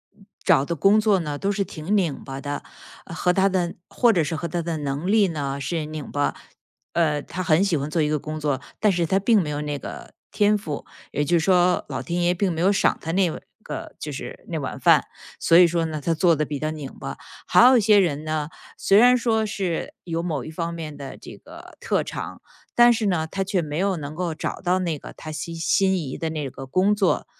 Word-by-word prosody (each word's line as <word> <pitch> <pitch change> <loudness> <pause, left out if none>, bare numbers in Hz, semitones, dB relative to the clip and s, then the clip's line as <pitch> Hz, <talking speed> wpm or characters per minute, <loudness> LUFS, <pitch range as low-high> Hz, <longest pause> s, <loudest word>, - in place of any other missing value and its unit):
嗯， 200 -1 -21 0.2
找 165 -8 +4
的 170 - -2
工 195 +7 +4
作 210 -3 +3
呢， 150 -4 -3
都 200 - -1
是 200 0 0
挺 175 +2 -3
拧 165 -7 -1
巴 135 0 -6
的， 145 0 -4 0.4
和 180 +2 0
他 195 +1 +3
的 180 -2 -1
或 240 -2 +3
者 170 -5 +2
是 160 +2 -2
和 170 - -3
他 170 +2 -2
的 165 -1 -3
能 145 +3 -3
力 215 -2 +5
呢， 140 -4 -3
是 155 +2 -2
拧 155 -2 -7
巴。 145 0 0 0.6
呃， 150 -4 +1
他 185 - -6
很 165 +1 +3
喜 190 -5 +1
欢 140 +1 -3
做 160 +1 0
一 150 - +1
个 150 - 0
工 155 +2 -5
作， 145 -3 -1 0.2
但 210 - +3
是 175 -2 +1
他 190 +4 +1
并 210 +1 +4
没 150 - -3
有 145 0 -3
那 145 -1 -3
个 - - -9 0.2
天 210 0 +3
赋， 150 -8 -6 0.3
也 145 - 0
就 170 +4 +2
是 160 - -2
说 180 -1 +3
老 - - -4
天 175 0 -2
爷 175 +1 +3
并 185 +1 0
没 160 - -4
有 185 - +4
赏 200 - +2
他 165 - -4
那 185 -1 +3 0.3
个 - - -7
就 - - -6
是 - - -8
那 - - -2
碗 - - -5
饭。 - - +4 0.3
所 165 - +5
以 180 - +9
说 170 -1 0
呢， 155 -2 -4
他 165 +4 +1
做 165 0 +3
得 155 - 0
比 145 -2 -4
较 155 - -1
拧 145 -4 -7
巴。 70 - -5 0.3
还 - - +6
有 255 0 +7
一 - - +3
些 210 0 +5
人 155 -5 0
呢， 155 -1 -2 0.3
虽 195 - +4
然 250 +2 +7
说 225 -2 +1
是 195 -5 -3
有 165 -1 -2
某 155 -7 -2
一 155 - -8
方 170 +1 -3
面 155 -3 -6
的 135 -2 -8
这 - - -11
个 - - -14
特 - - 0
长， - - -6 0.3
但 240 0 +7
是 225 -2 0
呢， 175 -5 +1
他 195 +5 -4
却 190 -1 0
没 150 -1 -4
有 195 0 +1
能 145 -2 -6
够 170 -1 -3
找 - - -4
到 185 0 +1
那 165 -5 -2
个 - - -10
他 155 - -8
心 165 +2 -5
心 190 +3 +2
仪 140 -6 -4
的 165 - -2
那 150 -4 -3
个 135 - -9
工 185 +10 +2
作， 200 -3 +1
170 Hz, 260 characters per minute, -23 LUFS, 150-190 Hz, 0.6 s, 以